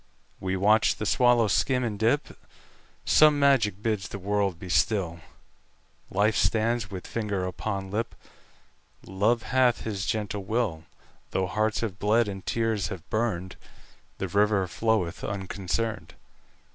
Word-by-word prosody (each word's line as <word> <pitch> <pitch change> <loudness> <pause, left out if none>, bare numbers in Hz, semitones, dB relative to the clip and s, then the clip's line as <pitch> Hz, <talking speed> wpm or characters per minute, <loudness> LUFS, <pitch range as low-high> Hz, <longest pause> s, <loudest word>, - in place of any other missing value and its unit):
We 95 0 -2
watch 105 +3 +4
the 105 - -4
swallow 120 0 +4
skim 125 +5 +1
and 105 -4 -3
dip; 120 +7 +1 0.7
Some 150 -1 +6
magic 115 -8 +2
bids 105 -3 -1
the - - -7
world 100 -2 -1
be 90 - -9
still; 90 -2 +1 0.9
Life 105 +2 +2
stands 115 +1 +1
with 95 -2 -7
finger 105 -5 -2
upon 95 +1 -4
lip; 110 +2 -2 0.9
Love 110 +5 +1
hath 125 -4 +2
his 100 -3 -4
gentle 105 -2 -2
will; 100 -6 -1 0.4
Though 95 - 0
hearts 110 +3 0
have 100 -5 -4
bled, 110 +2 +3
and 95 -2 -6
tears 110 -5 0
have 85 -2 -8
burned, 95 -5 -2 0.6
The 95 - -3
river 100 0 +2
floweth 105 -3 -1
unconcerned. 95 -2 -3
105 Hz, 135 wpm, -27 LUFS, 95-115 Hz, 0.9 s, Some